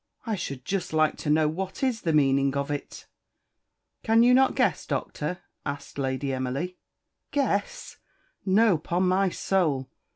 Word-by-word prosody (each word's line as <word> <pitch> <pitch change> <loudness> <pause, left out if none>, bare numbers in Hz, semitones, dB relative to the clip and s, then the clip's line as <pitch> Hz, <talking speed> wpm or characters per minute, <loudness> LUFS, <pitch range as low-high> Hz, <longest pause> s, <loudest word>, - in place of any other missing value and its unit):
I 225 - -1
should 140 -9 -5
just 195 -4 -2
like 155 -1 +3
to 150 - -4
know 155 +1 +4
what 190 - -4
is 250 -4 0
the 165 - 0
meaning 140 -2 +3
of 140 +1 -2
it?" 145 - -6 1.0
"Cannot 245 +4 +5
you - - -9
guess, - - +1
Doctor" 150 +4 -3 0.2
asked 140 0 -6
Lady 135 0 -1
Emily. 135 +8 -3 0.5
"Guess! 250 -8 -1 0.5
No, 195 -2 +4
'pon 175 +4 0
my 190 +1 +3
soul! 160 -9 0
165 Hz, 140 wpm, -26 LUFS, 140-195 Hz, 1.0 s, Cannot